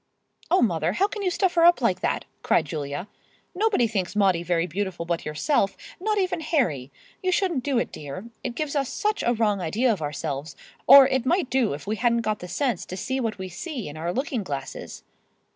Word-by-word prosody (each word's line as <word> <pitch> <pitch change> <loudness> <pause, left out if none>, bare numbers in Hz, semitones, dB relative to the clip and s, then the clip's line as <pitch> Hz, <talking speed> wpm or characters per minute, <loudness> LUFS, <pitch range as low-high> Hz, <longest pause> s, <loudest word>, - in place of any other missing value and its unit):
"Oh, 370 - +4
mother, 170 -5 +1
how 390 - +2
can 420 0 -6
you 380 - +1
stuff 360 0 +1
her 335 - +3
up 345 +1 +6
like - - +1
that?" - - -1 0.2
cried - - +2
Julia. 145 +3 -4 0.5
"Nobody 400 - +2
thinks 195 -4 -2
Maudie 190 -4 +3
very 175 -1 0
beautiful 185 -1 -3
but 170 0 -2
yourself—not 290 - -1
even 370 -3 0
Harry. 210 - 0 0.3
You 370 -1 +1
shouldn't 350 -8 +1
do 275 -2 0
it, 235 - 0
dear. 145 +7 -7 0.2
It 240 - -4
gives 305 +1 -3
us 275 -3 0
such 420 0 -1
a 240 - +2
wrong 210 -3 +1
idea 225 +9 +1
of 195 - -6
ourselves, 145 0 -4 0.3
or 275 0 +10
it 265 -2 0
might 345 -4 +1
do 255 - +2
if 145 - -10
we 215 +2 -2
hadn't 235 +1 +2
got 215 -1 -1
the 180 - -7
sense 220 +2 -1
to 185 - -6
see 260 +7 -2
what 225 -4 -2
we 190 -1 -5
see 245 - -6
in 145 - -8
our 165 +2 -2
looking 265 - -2
glasses." 145 -8 -6
225 Hz, 210 wpm, -25 LUFS, 175-290 Hz, 0.5 s, or